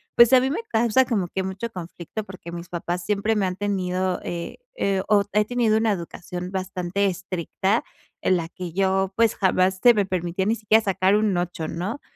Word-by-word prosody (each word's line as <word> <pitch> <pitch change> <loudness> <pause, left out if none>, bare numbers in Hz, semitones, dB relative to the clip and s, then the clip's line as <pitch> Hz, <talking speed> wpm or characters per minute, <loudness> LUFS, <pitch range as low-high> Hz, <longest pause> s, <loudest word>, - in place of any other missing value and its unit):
pues, 235 +1 +7
a 255 - +8
mí 260 - +1
me 395 +10 -2
causa 235 +3 +3
como 210 -8 0
que 190 - -2
mucho 190 +5 -4
conflicto, 180 +2 -7
porque 185 -4 -10
mis 170 0 -7
papás 175 +1 -3
siempre 210 +2 +1
me 205 -2 +1
han 180 0 -4
tenido 185 -2 -1
eh, 170 -1 -5 0.2
eh, 195 - 0
o, 205 -2 +5
he 210 0 +3
tenido 230 -2 +2
una 220 0 +2
educación 180 -1 -5
bastante 190 0 -2
estricta 190 +3 -1 0.4
en 185 - +3
la 165 -1 -4
que 180 -2 -7
yo, 190 0 +1
pues, 230 -1 +3
jamás 185 0 +2
se 245 - +8
me 205 -2 +2
permitía 180 0 -2
ni 225 - +2
siquiera 220 0 +3
sacar 195 -1 +2
un 210 -2 +2
8, 175 -2 -3
¿no? 190 - -4
190 Hz, 195 wpm, -24 LUFS, 180-215 Hz, 0.4 s, a